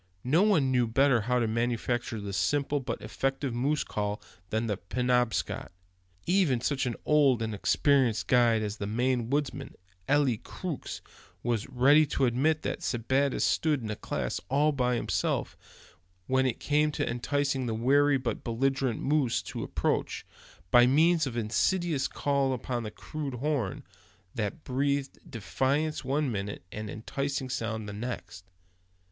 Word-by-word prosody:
No 150 Hz, +8 st, +3 dB
one 175 Hz, -11 st, +3 dB
knew 125 Hz, -2 st, +2 dB
better 130 Hz, +1 st, +3 dB
how 125 Hz, +4 st, 0 dB
to 120 Hz, -2 st, +1 dB
manufacture 120 Hz, 0 st, -1 dB
the 100 Hz, -1 st, -5 dB
simple 145 Hz, +6 st, +1 dB
but 125 Hz, -3 st, -4 dB
effective 135 Hz, +4 st, -2 dB
moose 140 Hz, +5 st, 0 dB
call 105 Hz, 0 st, -3 dB, 0.3 s
than 110 Hz, +1 st, 0 dB
the 105 Hz, -3 st, -1 dB
Penobscot. 125 Hz, 0 st, -1 dB, 0.5 s
Even 175 Hz, -10 st, +3 dB
such 130 Hz, +2 st, -1 dB
an 120 Hz, -, -2 dB
old 140 Hz, -6 st, +4 dB
and 110 Hz, -1 st, -3 dB
experienced 130 Hz, +2 st, +2 dB
guide 115 Hz, -3 st, +3 dB
as 105 Hz, 0 st, -4 dB
the 100 Hz, -, -4 dB
Maine 120 Hz, +2 st, 0 dB
woodsman, 140 Hz, -1 st, -2 dB, 0.3 s
Eli 140 Hz, -5 st, +3 dB
Crookes, 175 Hz, -8 st, -6 dB, 0.4 s
was 120 Hz, -2 st, -1 dB
ready 140 Hz, +4 st, +5 dB
to 135 Hz, -, +1 dB
admit 145 Hz, +6 st, +1 dB
that -, -, -3 dB
Sebattis 130 Hz, +4 st, 0 dB
stood 150 Hz, -6 st, +1 dB
in 110 Hz, -, -3 dB
a -, -, -3 dB
class -, -, -3 dB
all 145 Hz, +3 st, +3 dB
by 125 Hz, -3 st, +1 dB
himself, -, -, -1 dB, 0.7 s
when 130 Hz, +3 st, +2 dB
it 125 Hz, -, -2 dB
came 150 Hz, +1 st, +2 dB
to -, -, -1 dB
enticing 135 Hz, +1 st, -1 dB
the 115 Hz, -, -1 dB
wary 140 Hz, +5 st, +3 dB
but 120 Hz, -4 st, -3 dB
belligerent 130 Hz, +1 st, 0 dB
moose 140 Hz, -5 st, +1 dB
to -, -, -6 dB
approach, -, -, -1 dB, 0.5 s
by 120 Hz, 0 st, +7 dB
means 160 Hz, +3 st, +4 dB
of 120 Hz, -2 st, -5 dB
insidious 150 Hz, -, +1 dB
calls 140 Hz, -2 st, 0 dB
upon 120 Hz, 0 st, -3 dB
the 110 Hz, -, -5 dB
crude 140 Hz, +4 st, -6 dB
horn, 130 Hz, -6 st, -2 dB, 0.5 s
that 115 Hz, +9 st, -3 dB
breathed 140 Hz, +1 st, -1 dB
defiance 135 Hz, +6 st, -1 dB
one 140 Hz, 0 st, 0 dB
minute, 100 Hz, -3 st, -4 dB
and 110 Hz, 0 st, -6 dB
enticing 135 Hz, +4 st, -3 dB
sounds 110 Hz, -2 st, -3 dB
the 100 Hz, -, -6 dB
next. 95 Hz, -5 st, -6 dB
130 Hz, 150 wpm, -29 LUFS, 115-140 Hz, 0.7 s, by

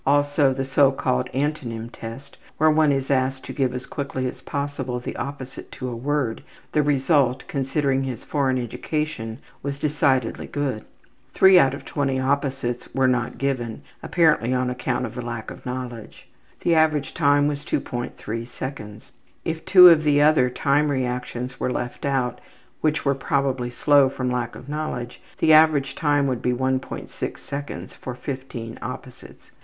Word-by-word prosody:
Also, 145 Hz, 0 st, +3 dB
the 135 Hz, 0 st, -2 dB
so 135 Hz, 0 st, +4 dB
called 125 Hz, -1 st, -1 dB
Antonym 130 Hz, -5 st, -2 dB
Test, 120 Hz, +5 st, -9 dB, 0.2 s
where 155 Hz, 0 st, +5 dB
one 155 Hz, -1 st, +4 dB
is 135 Hz, 0 st, -1 dB
asked 130 Hz, 0 st, 0 dB
to -, -, -6 dB
give 135 Hz, -3 st, +1 dB
as 125 Hz, 0 st, -5 dB
quickly 135 Hz, -2 st, -4 dB
as 125 Hz, -, -5 dB
possible 140 Hz, -3 st, -3 dB
the 120 Hz, -, -6 dB
opposite 135 Hz, -2 st, -7 dB
to 130 Hz, -, -5 dB
a 120 Hz, -, -5 dB
word, 135 Hz, -1 st, -1 dB, 0.3 s
the 150 Hz, -, +3 dB
result, 135 Hz, -2 st, +2 dB
considering 135 Hz, 0 st, 0 dB
his 130 Hz, -3 st, -4 dB
foreign 135 Hz, -3 st, 0 dB
education, 125 Hz, -1 st, -3 dB, 0.2 s
was 140 Hz, -1 st, -3 dB
decidedly 140 Hz, -5 st, +1 dB
good. 140 Hz, -6 st, -2 dB, 0.5 s
Three 190 Hz, -1 st, +8 dB
out 135 Hz, -3 st, +3 dB
of -, -, -11 dB
twenty 135 Hz, -2 st, -1 dB
opposites 135 Hz, -2 st, -1 dB
were 135 Hz, -1 st, +3 dB
not 125 Hz, -2 st, 0 dB
given, 130 Hz, -5 st, -2 dB, 0.2 s
apparently 145 Hz, -7 st, +2 dB
on 125 Hz, 0 st, 0 dB
account 125 Hz, 0 st, -2 dB
of 115 Hz, -, -7 dB
the 125 Hz, -, -5 dB
lack 120 Hz, -2 st, -5 dB
of -, -, -10 dB
knowledge. 125 Hz, -3 st, -6 dB, 0.3 s
The 170 Hz, -, +2 dB
average 155 Hz, -3 st, +2 dB
time 145 Hz, 0 st, +3 dB
was 145 Hz, -1 st, -3 dB
2.3 120 Hz, -3 st, -4 dB
seconds. 120 Hz, -5 st, -8 dB, 0.3 s
If 160 Hz, 0 st, -3 dB
two 180 Hz, -2 st, +10 dB
of 160 Hz, -2 st, +5 dB
the 145 Hz, -1 st, +4 dB
other 145 Hz, -4 st, +5 dB
time 145 Hz, +4 st, +2 dB
reactions 125 Hz, -1 st, -3 dB
were 125 Hz, -, 0 dB
left 120 Hz, +1 st, -4 dB
out, 130 Hz, -3 st, 0 dB, 0.4 s
which 155 Hz, -1 st, 0 dB
were 140 Hz, -, +3 dB
probably 135 Hz, -2 st, -1 dB
slow 140 Hz, +2 st, +4 dB
from 125 Hz, -1 st, -2 dB
lack 120 Hz, -2 st, -2 dB
of 130 Hz, -, -11 dB
knowledge, 145 Hz, -5 st, -4 dB, 0.2 s
the 155 Hz, -, +4 dB
average 155 Hz, -3 st, +5 dB
time 145 Hz, -2 st, +2 dB
would 130 Hz, -3 st, -1 dB
be 125 Hz, -, +1 dB
1.6 130 Hz, +1 st, -3 dB
seconds 140 Hz, +1 st, -6 dB
for 125 Hz, -, -7 dB
15 125 Hz, -4 st, -6 dB
opposites. -, -, -9 dB
135 Hz, 160 wpm, -23 LUFS, 125-145 Hz, 0.5 s, two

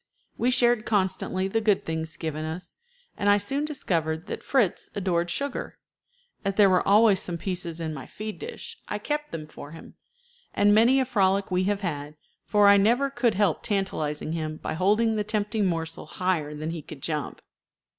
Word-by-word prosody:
We 245 Hz, -, +1 dB
shared 240 Hz, -3 st, +3 dB
constantly 190 Hz, -2 st, 0 dB
the 225 Hz, +3 st, 0 dB
good 210 Hz, -3 st, +2 dB
things 160 Hz, 0 st, -3 dB
given 155 Hz, -1 st, -4 dB
us, 160 Hz, +3 st, -6 dB, 0.4 s
and 205 Hz, -, +1 dB
I 205 Hz, -, +6 dB
soon 270 Hz, +9 st, -1 dB
discovered 165 Hz, -, -2 dB
that -, -, -5 dB
Fritz 245 Hz, -10 st, +1 dB
adored 175 Hz, -3 st, 0 dB
sugar. 280 Hz, +10 st, -3 dB, 0.7 s
As 195 Hz, -1 st, -1 dB
there 200 Hz, -2 st, +6 dB
were 180 Hz, -, +4 dB
always 205 Hz, -1 st, +6 dB
some 175 Hz, -2 st, -3 dB
pieces 175 Hz, -2 st, -3 dB
in 160 Hz, -1 st, -3 dB
my 135 Hz, -4 st, -8 dB
feed 215 Hz, 0 st, -7 dB
dish, 460 Hz, 0 st, -7 dB
I 210 Hz, -, -2 dB
kept 295 Hz, +7 st, -3 dB
them 155 Hz, -2 st, -5 dB
for 150 Hz, 0 st, -11 dB
him, 165 Hz, -, -12 dB, 0.6 s
and 205 Hz, 0 st, +5 dB
many 235 Hz, +5 st, +5 dB
a 260 Hz, -, +2 dB
frolic 200 Hz, -5 st, +1 dB
we 185 Hz, 0 st, +1 dB
have 200 Hz, 0 st, 0 dB
had, 150 Hz, -5 st, -4 dB, 0.3 s
for 205 Hz, -1 st, +5 dB
I 200 Hz, 0 st, +8 dB
never 240 Hz, +7 st, +3 dB
could 240 Hz, -6 st, +1 dB
help 200 Hz, -5 st, +2 dB
tantalizing 155 Hz, -8 st, -2 dB
him 155 Hz, -1 st, -3 dB
by -, -, -4 dB
holding 215 Hz, +6 st, +2 dB
the 210 Hz, -, +1 dB
tempting 210 Hz, 0 st, 0 dB
morsel 165 Hz, -2 st, -3 dB
higher 160 Hz, -4 st, -1 dB
than 155 Hz, +2 st, -4 dB
he 165 Hz, -2 st, -5 dB
could 145 Hz, -1 st, -11 dB
jump. 150 Hz, -3 st, -3 dB
195 Hz, 185 wpm, -26 LUFS, 160-215 Hz, 0.7 s, I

